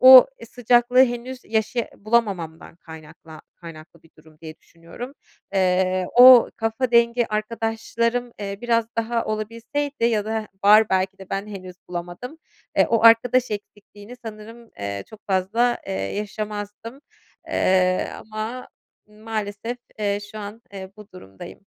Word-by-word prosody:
o 255 0 +10 0.2
sıcaklığı 245 +1 +4
henüz 245 +1 -6
yaşaya 220 +2 -1
bulamamamdan 200 -8 -2
kaynakla 160 -1 -13
kaynaklı 165 -1 -13
bir 165 - -23
durum 155 0 -20
diye 155 -1 -10
düşünüyorum. 170 +11 -11 0.4
Eee, 185 -1 +1
o 250 -1 +9
kafa 225 +3 -1
dengi 235 0 +3
arkadaşlarım, 230 +2 -2
eee, 200 -1 -5
biraz 230 -1 +1
daha 230 +1 -1
olabilseydi 230 +6 -3
ya 220 -3 +2
da 220 0 -3 0.2
var, 215 +1 +7
belki 190 +1 0
de 190 - -13
ben 195 +2 -3
henüz 185 -3 -9
bulamadım, 175 - -7 0.4
eee, - - +5
o 230 -1 +2
arkadaş 235 +2 +5
eksikliğini 205 +2 -9
sanırım, 225 +1 -10
eee, 100 -1 -5
çok 215 -1 -16
fazla, 205 +6 +1
eee, - - -4
yaşamazdım, 205 - -5 0.5
eee, 185 -1 +2
ama 220 +4 -6 0.4
maalesef, 215 +2 -5 0.2
eee, 205 -1 0
şu 215 - -7
an, 210 +2 -8
eee, 190 -1 -8
bu 210 -1 -13
durumdayım. 95 - -12
215 Hz, 130 wpm, -23 LUFS, 190-235 Hz, 0.5 s, o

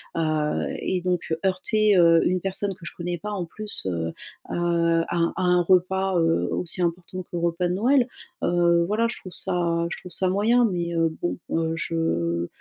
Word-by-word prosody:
heu 155 -2 0
et 185 - -1
donc 180 -2 -1
heurter, 205 +2 +2
heu, 165 -1 +6
une 185 +1 +2
personne 195 +2 -1
que 180 -1 -14
je - - -5
connais 175 0 -3
pas 210 +5 -6
en 200 -3 -2
plus, 210 - -4
heu, 80 -2 -2 0.3
à, - - -5
heu, 170 -1 +2
à - - -1
un 170 0 +1
à - - -3
un 180 -1 +4
repas, 190 +1 +2
heu, 165 0 +2
aussi 180 +1 -2
important 175 +1 -2
que - - -37
le 175 - -1
repas 170 +1 0
de 175 - -1
Noël, 245 +5 +3 0.4
heu, 170 -1 +3
voilà 220 +3 +1
je - - -3
trouve 185 - -10
ça 170 -1 -1
je - - -5
trouve 180 - -11
ça 185 - -1
moyen. 225 +6 +3
Mais, 175 -5 -1
heu, 165 0 +2
bon, 175 - -1
heu, 165 0 0
je 85 - -1
175 Hz, 205 wpm, -24 LUFS, 165-190 Hz, 0.4 s, heu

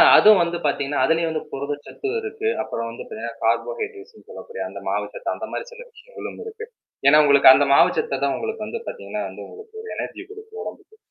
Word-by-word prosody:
அதுவும் 215 -2 +8
வந்து 170 0 -2
பாத்தீங்கன்னா, 140 -1 +1
அதுலயும் 160 +1 +1
புரதச்சத்து 145 - -5
இருக்கு 440 0 -2
அப்பறம் 115 0 -4
வந்து 115 - -8
பாத்தீங்கன்னா, 115 +1 -6
கார்போஹைட்ரேட்ஸ்ன்னு 430 - -2
சொல்லக்கூடிய 470 0 -7
அந்த - - -9
மாவு - - 0
சத்து, - - -3
அந்தமாரி - - -5
சில 485 0 -11
விஷயங்களும் 470 +2 -10
இருக்கு. 450 0 -8 0.4
ஏனா 150 +2 +8
உங்களுக்கு 140 -2 +8
அந்த 145 - +4
மாவுச் 140 - +5
சத்த 465 +2 -2
தான் - - 0
உங்களுக்கு 445 0 -4
வந்து 465 - -5
பாத்தீங்கன்னா - - -5
வந்து - - -9
உங்களுக்கு 440 0 -12
ஒரு 445 - -9
எனர்ஜிய - - -5
குடுக்கும் 440 +1 -11 0.2
உடம்புக்கு. 435 - -24
420 Hz, 180 wpm, -23 LUFS, -, 0.4 s, அதுவும்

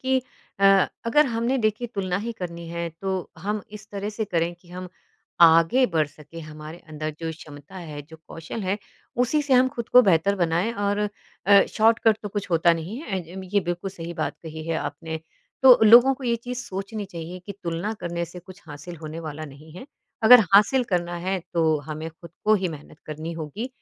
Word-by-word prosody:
कि 260 0 +2 0.4
अ, - - +3 0.4
अगर 300 +5 +5
हमने 235 +2 0
देखिए 215 +3 0
तुलना 185 -3 -1
ही 235 - -2
करनी 170 -5 -7
है 170 0 -3
तो 195 -1 -1 0.3
हम 210 0 -1 0.2
इस 210 0 -17
तरह 200 0 -4
से 220 - -1
करें 170 -3 -1
कि 175 - -22
हम 180 +1 -7 0.6
आगे 165 +11 +5
बढ़ 155 -2 +3
सकें। 150 +2 -12
हमारे 155 +1 -9
अंदर 155 0 -4
जो 165 -1 -3
क्षमता 150 +1 -12
है, 145 -1 -6
जो 160 +3 -14
कौशल 165 +7 -7
है, 190 +2 -1 0.4
उसी 250 +5 +2
से 285 -2 -1
हम 255 +1 +5
खुद 235 -1 -5
को 250 - +7
बेहतर 175 +4 +3
बनाएँ 170 +7 0
और 205 0 0 0.5
अ, 200 0 +7
शॉर्टकट 225 0 +4
तो 205 - -4
कुछ 200 -1 -5
होता 170 0 +4
नहीं 190 +9 -6
है 195 -11 -3
ए 170 0 -12
अम, 190 - -6
ये 200 - +5
बिल्कुल 175 +2 -4
सही 170 -2 -7
बात - - -3
कही 160 -1 -8
है 165 - 0
आपने। 160 -1 -6 0.4
तो 260 -2 +9
लोगों 245 +3 +8
को - - -7
ये 235 -1 +1
चीज़ 250 0 -4
सोचनी 200 +3 -5
चाहिए 170 +1 -7
कि 200 - -5
तुलना 170 +4 -2
करने 170 0 -3
से 175 +2 -11
कुछ 185 +2 -14
हासिल 150 +4 -9
होने 155 +1 -6
वाला 155 +1 -6
नहीं 155 +3 -15
है। 185 - -10 0.4
अगर 245 +2 +10
हासिल 245 +6 +5
करना 175 0 -1
है 190 +1 -1 0.2
तो 170 - +2 0.3
हमें 155 +1 -5
खुद 170 +1 -14
को 215 - +5
ही 190 -3 0
मेहनत 150 -1 -10
करनी 155 +2 -5
होगी, 165 - -5
180 Hz, 205 wpm, -24 LUFS, 165-215 Hz, 0.6 s, अगर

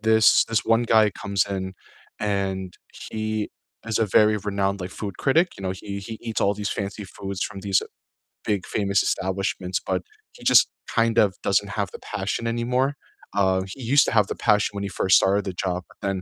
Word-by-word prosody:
this 110 0 +5
this 115 -1 0
one 115 +1 +3
guy 110 -2 +4
comes 100 -1 -1
in 95 -1 -4 0.4
and 95 -3 -2 0.4
he 110 -1 -2 0.4
is 115 -1 0
a 110 - +2
very 105 +2 +4
renowned, 100 -1 -1
like, 90 +1 -5
food 100 -1 -6
critic, 165 +6 +3
you - - -8
know, 95 - -1
he 100 +1 -6
he 110 +3 -7
eats 115 -2 -3
all 100 - +2
these 105 0 -3
fancy 100 +1 -4
foods 95 0 -5
from 100 -2 -4
these 95 -1 +2 0.6
big 100 -3 0
famous 100 -2 +1
establishments, 95 -1 -1
but 90 -1 -1 0.3
he - - -15
just - - +6 0.2
kind 115 0 +2
of 100 -5 +4
doesn't 100 +1 +1
have 100 -2 -2
the - - -9
passion 105 +3 -3
anymore, 125 +4 0 0.4
uh, 95 -2 +3
he 130 +8 -9
used 140 +5 +5
to - - -1
have 105 -4 +3
the - - -4
passion 105 -2 +2
when 100 - -4
he 100 - -3
first 95 -1 +4
started 100 +1 +2
the 95 - -3
job 90 0 -2 0.2
and 95 -1 -1
100 Hz, 195 wpm, -24 LUFS, 95-110 Hz, 0.6 s, just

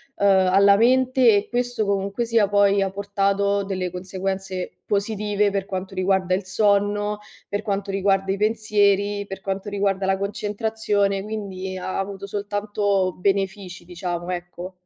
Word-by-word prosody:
uhm, 200 - 0
alla 195 +1 +5
mente 255 0 +4
e 205 - 0
questo 245 -3 -1
comunque 200 +3 -1
sia 230 -3 +3
poi 200 0 +3
ha 195 - +1
portato 200 0 0
delle 185 -2 -3
conseguenze 190 0 -4
positive 205 0 0
per 195 -1 -2
quanto 190 -1 -5
riguarda 185 -1 +1
il 185 +1 -1
sonno, 205 +1 +1 0.3
per 205 +1 -2
quanto 200 -2 -2
riguarda 195 0 +1
i 195 - -1
pensieri, 205 -1 +1
per 195 0 -7
quanto 195 +1 -4
riguarda 195 -1 0
la 190 0 +1
concentrazione, 205 -1 -1
quindi 195 -3 -5
ha 185 +1 -3
avuto 195 0 -4
soltanto 205 -2 -1
benefici 195 -1 -1
diciamo, 175 -1 -5
ecco. 175 +1 -6
200 Hz, 140 wpm, -23 LUFS, 190-205 Hz, 0.3 s, alla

